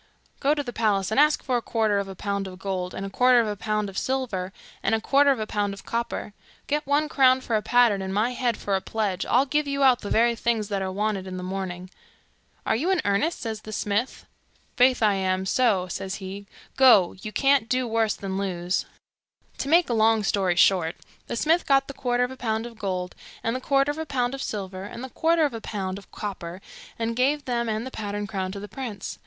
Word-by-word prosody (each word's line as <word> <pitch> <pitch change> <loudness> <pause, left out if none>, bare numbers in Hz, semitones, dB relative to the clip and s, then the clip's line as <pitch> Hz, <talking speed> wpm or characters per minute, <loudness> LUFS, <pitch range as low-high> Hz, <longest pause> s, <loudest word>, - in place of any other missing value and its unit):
'Go 290 +2 +2
to 290 - -2
the 245 -3 -6
palace 210 -3 +1
and 220 - +2
ask 300 +1 +4
for 255 -3 +1
a - - -2
quarter 220 -3 +1
of 200 - -3
a 195 - -8
pound 200 +1 -3
of 185 -1 -9
gold, 185 -2 -4
a 195 +1 -4
quarter 250 +3 +5
of 230 - +2
a 210 - -2
pound 210 +1 -1
of 195 -1 -3
silver, 235 -9 -2 0.3
and - - +2
a - - 0
quarter 280 +5 +4
of 270 -4 +2
a 215 - -2
pound 205 -2 -2
of - - -14
copper. 230 -2 -3 0.3
Get 295 0 -1
one 290 +2 +2
crown 260 -3 +4
for 230 - -1
a 215 - +2
pattern, 235 -4 +3
and 190 0 -4
my 215 +5 +1
head 245 -2 -1
for 200 - -1
a 190 - 0
pledge, 200 -4 -2
I'll 255 +3 +4
give 295 +1 0
you 280 0 0
out 255 -2 +5
the 205 - -5
very 235 +1 +3
things 225 -2 -1
that 200 -2 -1
are 190 0 -2
wanted 200 -1 -2
in 185 0 -5
the 180 - -5
morning.' 185 -1 -5 0.7
'Are - - +2
you 305 +11 0
in 380 -1 +2
earnest?' 205 +12 +1
says 220 -2 -4
the 215 - -9
smith. 210 +4 -2 0.5
'Faith, 250 -1 +4
I 210 -2 +5
am 190 -1 0
so,' 200 -4 +2
says 190 +2 -4
he. 195 +1 -8 0.3
'Go! 235 -9 +6
you 215 - -6
can't 275 -2 +2
do 255 -1 +1
worse 225 -1 +1
than 195 -1 -4
lose.' 180 -2 -2 0.7
To 275 - -2
make 340 +2 +5
a 240 - -1
long 220 -1 +3
story 190 -3 +1
short, 175 -3 +3 0.3
the - - -3
smith 320 +8 +2
got 275 -1 +4
the 275 - -7
quarter 245 -2 0
of 250 - -2
a 260 - -9
pound 225 -2 -2
of 230 -2 -10
gold, 185 -3 -3 0.3
and 230 +2 0
the 255 - -3
quarter 275 +1 +2
of 300 - -7
a 320 - -4
pound 250 -2 0
of 275 - -5
silver, 190 -5 -5
and 235 +4 -8
the 260 - -6
quarter 325 -1 +2
of 285 - -2
a 225 - -6
pound 195 -3 -4
of 200 - -19
copper, 185 -4 -6 0.4
and 230 0 -2
gave 280 +4 +1
them 235 -2 -1
and 220 +2 -2
the 260 - -6
pattern 205 -2 -4
crown 190 -2 -3
to 200 - -6
the 205 - -7
prince. 230 -5 -6
220 Hz, 240 wpm, -25 LUFS, 195-255 Hz, 0.7 s, Go